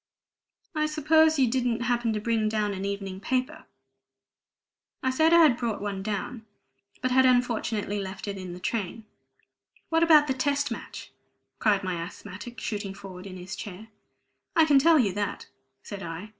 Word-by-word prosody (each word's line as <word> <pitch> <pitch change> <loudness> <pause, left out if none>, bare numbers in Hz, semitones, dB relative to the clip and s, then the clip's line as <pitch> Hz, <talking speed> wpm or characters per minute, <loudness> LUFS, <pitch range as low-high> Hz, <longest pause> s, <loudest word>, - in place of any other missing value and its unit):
I 305 -1 +1
suppose 315 +1 +4
you 265 -2 +4
didn't 240 -1 0
happen 240 -1 +1
to 210 - -1
bring 220 0 0
down 210 -1 0
an 190 0 -4
evening 195 -1 -4
paper?" 260 +8 -2 1.4
I 260 - +2
said 315 +5 +3
I 340 0 +8
had 270 -7 +5
brought 230 -4 -2
one, 200 -1 -4 1.0
but 255 - +1
had 260 +1 +5
unfortunately 235 -5 +1
left 195 +1 -6
it 200 - -3
in 185 -1 -7
the 180 - -9
train. 215 +2 -3 0.8
"What 325 0 +2
about 315 -3 +7
the 265 - 0
Test 280 +2 0
Match?" - - -7 0.5
cried 205 -3 +2
my 180 -3 -2
asthmatic, 205 +6 -8
shooting 205 -3 -4
forward 195 -1 -10
in 185 -1 -8
his 180 +1 -7
chair. 210 +2 -8 0.7
"I 325 - +6
can 290 -3 +5
tell 325 +3 +5
you 210 -9 +2
that," 205 0 -3 0.4
said 200 -1 -7
I. 170 +4 -6
220 Hz, 165 wpm, -27 LUFS, 200-260 Hz, 1.4 s, I